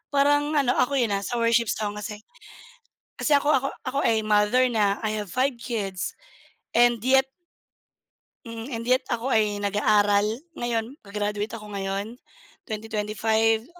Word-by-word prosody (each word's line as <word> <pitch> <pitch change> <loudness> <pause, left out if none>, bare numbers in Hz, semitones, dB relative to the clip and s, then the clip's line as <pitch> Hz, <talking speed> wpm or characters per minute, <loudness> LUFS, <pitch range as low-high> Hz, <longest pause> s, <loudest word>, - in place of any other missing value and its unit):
parang 290 +2 +3
ano, 270 -4 +3
ako 275 +3 +2
yun, 235 -5 +1
ah, 200 - +1
sa 240 - -3
worship 230 -1 +2
song 210 0 -2
kasi, 210 0 -7 1.0
kasi 300 - +2
ako 290 +1 +3
ako 275 -1 +2
ako 275 +1 -3
ay 220 -1 +2
mother 215 +4 +3
na, 205 -3 +1
I 215 0 -1
have 205 - -4
5 255 -1 +1
kids 200 -7 -4 0.6
and 240 -2 +3
yet 265 +1 +4 1.2
Mm, 230 0 -7
and 230 -1 -4
yet, 255 +1 +3
ako 240 +1 0
ay 210 -2 +2
nag-aaral 205 0 +2 0.3
ngayon. 235 +1 -2
Ga-graduate 210 +1 -3
ako 210 -1 -10
ngayon, 195 +3 -3 0.5
2025, 220 0 0
225 Hz, 145 wpm, -25 LUFS, 210-250 Hz, 1.2 s, yet